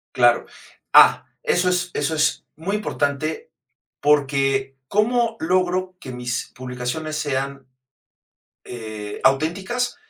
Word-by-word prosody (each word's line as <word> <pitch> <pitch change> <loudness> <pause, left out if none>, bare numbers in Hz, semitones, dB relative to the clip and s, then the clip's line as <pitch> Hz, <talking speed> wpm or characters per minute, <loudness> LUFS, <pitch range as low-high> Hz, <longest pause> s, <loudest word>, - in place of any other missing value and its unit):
Claro. - - +4 0.5
Ah, - - +7 0.2
eso 465 - +2
es 180 0 0
eso 145 +2 -1
es 150 0 +1
muy 190 +6 -3
importante 155 - -2 0.5
porque, 135 -2 +2
¿cómo 230 - +1
logro 185 +2 0
que 130 - -8
mis 125 -1 -4
publicaciones 125 +5 -4
sean, 140 -2 -3 1.0
eh, 110 -3 -7
auténticas? 190 - +1
150 Hz, 100 wpm, -22 LUFS, 135-185 Hz, 1.0 s, Ah